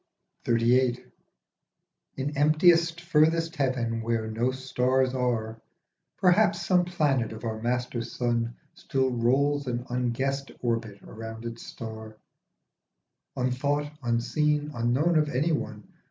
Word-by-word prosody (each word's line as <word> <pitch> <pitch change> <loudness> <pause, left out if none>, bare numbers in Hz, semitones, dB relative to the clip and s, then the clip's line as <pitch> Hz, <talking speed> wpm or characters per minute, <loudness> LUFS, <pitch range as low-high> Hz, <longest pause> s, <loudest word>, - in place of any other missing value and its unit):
XXXVIII. 120 +1 +2 1.1
IN 140 +3 -3
emptiest 165 +3 +4
furthest 165 0 +2
heaven 120 -4 0
where 115 -1 -1
no 115 +3 0
stars 130 0 0
are, 115 -3 -1 0.6
Perhaps 190 +3 +3
some 180 -1 +3
planet 145 -9 0
of 110 +1 -9
our 110 -1 -3
master 120 0 -1
sun 115 0 -2 0.2
Still 130 -1 -1
rolls 135 +4 +1
an 120 0 -2
unguessed 130 +3 -1
orbit 115 -4 -2
round 115 +1 -8
its 115 0 -6
star, 110 -1 -8 1.2
Unthought, 145 +4 -1
unseen, 145 +5 0
unknown 130 +8 +2
of 150 -1 +1
anyone. 130 -7 -1
125 Hz, 110 wpm, -27 LUFS, 115-145 Hz, 1.2 s, emptiest